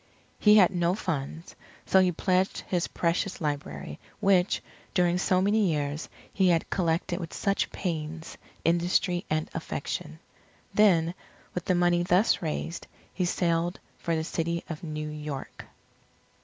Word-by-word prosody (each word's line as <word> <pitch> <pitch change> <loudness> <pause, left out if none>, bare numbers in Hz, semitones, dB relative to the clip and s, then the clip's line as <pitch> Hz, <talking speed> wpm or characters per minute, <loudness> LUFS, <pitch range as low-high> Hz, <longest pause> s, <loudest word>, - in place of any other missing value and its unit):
He 210 0 +7
had 190 -3 +6
no 175 0 +1
funds, 160 -4 -4 0.3
so 190 - +5
he 185 -1 +4
pledged 185 +2 +1
his 175 -2 0
precious 175 +3 -1
library, 105 - -4 0.2
which, 190 -1 +3 0.3
during 180 -1 +3
so 185 0 +2
many 205 -1 +3
years, 145 0 -2 0.2
he 190 -2 +3
had 165 -2 +1
collected 175 0 0
with 170 -3 -6
such 200 -2 0
pains, 160 -2 -4 0.3
industry, 175 +1 +2
and 155 0 0
affection. 75 - -4 0.6
Then, 175 -6 +4 0.4
with 180 - -4
the 185 - +2
money 175 0 +3
thus 180 +5 +3
raised, 165 +1 -3 0.3
he 185 - 0
sailed 175 0 0 0.2
for 170 - -1
the 160 - -1
City 170 +1 -2
of 160 -2 -6
New 155 -2 -4
York. 150 -2 -6
175 Hz, 140 wpm, -28 LUFS, 160-185 Hz, 0.6 s, He